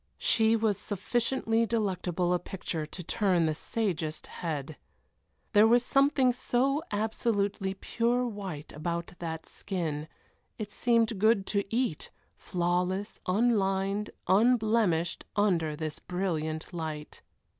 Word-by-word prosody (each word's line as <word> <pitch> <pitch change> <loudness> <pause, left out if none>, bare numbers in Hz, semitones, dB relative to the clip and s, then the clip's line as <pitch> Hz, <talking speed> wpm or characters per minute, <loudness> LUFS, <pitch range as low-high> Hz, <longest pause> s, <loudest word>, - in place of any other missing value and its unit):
She 225 - +3
was 215 -3 +1
sufficiently 225 +2 0
delectable 185 -5 0
a 180 - +2
picture 165 -5 -4
to 180 +3 -8
turn 180 -2 +2
the 155 - +1
sagest 165 -3 -2
head. 155 -3 -5 0.8
There 210 +1 +7
was 240 +2 +4
something 275 -2 +4
so 265 +4 +1
absolutely 205 -2 0
pure 240 +5 0
white 195 -10 -6
about 170 +3 -3
that 160 -1 -5
skin, 160 -6 -3 0.5
it 210 -2 -5
seemed 230 -3 +2
good 215 -1 +4
to 200 -1 +1
eat, 235 -9 0 0.3
flawless, 180 +3 -1
unlined, 200 -1 +1 0.2
unblemished, 215 -5 +3
under 170 -7 +2
this 155 -1 -4
brilliant 165 -3 -3
light. 155 -3 -5
195 Hz, 115 wpm, -29 LUFS, 170-225 Hz, 0.8 s, There